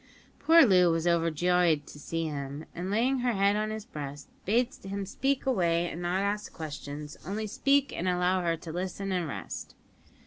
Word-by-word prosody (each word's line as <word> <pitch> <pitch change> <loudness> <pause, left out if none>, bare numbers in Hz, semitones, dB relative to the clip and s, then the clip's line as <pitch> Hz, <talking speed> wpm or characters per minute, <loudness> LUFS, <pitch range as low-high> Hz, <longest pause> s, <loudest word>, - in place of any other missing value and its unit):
Poor 330 -2 +7
Loo 180 -5 +5
was 165 0 0
overjoyed 170 -1 +2
to 145 - -12
see 165 +3 -3
him, 145 0 -5
and 180 +2 -4
laying 245 +6 +2
her 245 -1 +1
head 200 0 +3
on 215 0 0
his 215 -1 -5
breast, 145 - -7 0.2
bade 240 +5 +2
him 195 +1 -4
speak 270 +8 -1
away 175 -9 +2
and 170 - -6
not 180 +3 0
ask 205 +1 -2
questions; 150 -1 -7
only 205 +5 -3
speak, 280 +6 +2
and 185 - -1
allow 180 +1 +2
her 170 -1 0
to 160 - -8
listen 185 +3 -3
and 180 -3 0
rest. 100 - -6
180 Hz, 180 wpm, -29 LUFS, 165-210 Hz, 0.2 s, Poor